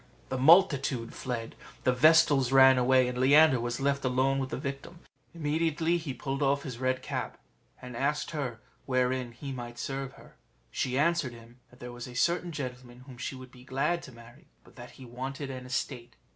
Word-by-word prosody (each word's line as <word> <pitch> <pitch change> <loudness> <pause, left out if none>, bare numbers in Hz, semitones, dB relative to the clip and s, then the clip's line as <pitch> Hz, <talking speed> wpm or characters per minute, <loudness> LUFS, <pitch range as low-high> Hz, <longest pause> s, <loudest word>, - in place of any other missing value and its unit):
The 130 - -2
multitude 140 -6 +4
fled, 120 -3 -5 0.3
the 130 - +3
vestals 145 -2 +5
ran 130 -1 +7
away, 130 0 +4
and 125 0 -4
Leander 140 +1 +6
was 120 0 -3
left 140 0 0
alone 130 +1 +1
with 130 -1 -3
the - - -4
victim; 140 +5 -7 0.3
immediately 160 +2 0
he 160 -4 -5
pulled 135 +2 -4
off 140 0 +1
his 125 -4 -7
red 130 0 -1
cap, - - -4 0.4
and 125 -1 -9
asked 145 +6 -1
her 135 -7 -4 0.3
wherein 130 -1 0
he 135 +4 -8
might 120 -2 -7
serve 135 +2 -4
her. 135 - -17 0.3
She 130 0 -1
answered 155 -4 +1
him, 120 +1 -15
that 125 - -20
there 125 0 -8
was 120 0 -8
a 125 - -11
certain 175 +6 +1
gentleman 125 -4 -7
whom 130 -1 -13
she 135 - -4
would 130 -1 -11
be 125 -1 -15
glad 150 +6 -1
to - - -11
marry, 120 +4 -16 0.2
but - - -20
that 120 -1 -11
he 130 - -11
wanted 135 +3 -6
an 130 -1 -8
estate. 125 -1 -4
130 Hz, 190 wpm, -29 LUFS, 125-140 Hz, 0.4 s, ran